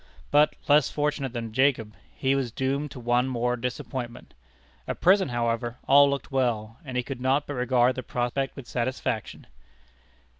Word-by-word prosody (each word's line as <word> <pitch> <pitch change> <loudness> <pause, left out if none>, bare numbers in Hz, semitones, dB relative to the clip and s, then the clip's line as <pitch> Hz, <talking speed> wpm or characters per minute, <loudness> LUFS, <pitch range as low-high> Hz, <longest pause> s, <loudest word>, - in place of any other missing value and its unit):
But, 150 +1 +4
less 145 -2 +5
fortunate 145 -3 -1
than 115 -2 -5
Jacob, 125 -4 +2 0.2
he 135 0 +1
was 135 -4 -1
doomed 135 +4 -1
to 130 - -9
one 120 +1 +1
more 125 -1 0
disappointment. 125 0 -5 0.5
At - - -4
present, 190 +1 +4
however, 120 0 -1
all 140 +1 +7
looked 140 -2 -3
well, 115 -4 -1
and 130 -4 -5
he 125 - +1
could 130 -1 -6
not 135 +3 +2
but 145 - -5
regard 125 -1 +2
the 130 - -5
prospect 125 +2 -2
with 135 - -9
satisfaction. 125 +2 -3
130 Hz, 160 wpm, -26 LUFS, 120-140 Hz, 0.5 s, all